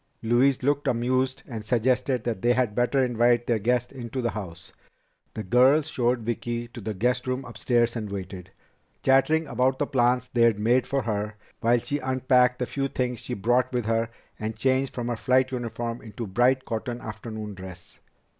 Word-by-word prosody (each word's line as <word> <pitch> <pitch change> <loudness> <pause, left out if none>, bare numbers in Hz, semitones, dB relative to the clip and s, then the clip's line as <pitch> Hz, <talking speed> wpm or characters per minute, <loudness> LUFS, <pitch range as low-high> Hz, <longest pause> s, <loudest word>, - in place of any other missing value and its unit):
Louise 125 +4 +3
looked 145 +1 +1
amused 130 +2 0
and 115 -4 -6
suggested 125 +2 +1
that 115 -5 -3
they 120 +1 +3
had 125 -4 +1
better 125 +4 +2
invite 120 -1 +2
their 115 -2 +1
guest 120 +3 0
into 130 -1 -6
the 120 -2 0
house. 85 -6 -8 0.6
The 110 - -4
girls 130 +8 +4
showed 120 -1 +1
Vicki 120 +1 -3
to 120 0 -9
the 105 +1 -4
guest 125 +5 0
room 130 +1 -2
upstairs 120 -1 0
and 110 -3 -4
waited, 95 -2 -7 0.5
chattering 145 +4 +3
about 130 -2 +1
the 145 - 0
plans 125 -2 +1
they'd 115 -3 +4
made 120 +4 +2
for 135 -1 0
her, 105 -1 -2 0.2
while 120 +1 +3
she 145 +5 -2
unpacked 130 -1 +2
the 125 - -1
few 135 +2 -2
things 125 -3 -2
she - - -6
had 95 - -7
brought 125 +2 +2
with 120 -3 -1
her 115 0 0 0.3
and 110 +1 -3
changed 130 +3 +1
from 120 -1 -3
her 120 - -1
flight 130 +4 +2
uniform 120 -1 -4
into 110 -1 -7
a - - -3
bright 125 +6 +2
cotton 120 +2 -4
afternoon 110 -1 -7
dress. 95 -2 -11
120 Hz, 185 wpm, -26 LUFS, 110-130 Hz, 0.6 s, girls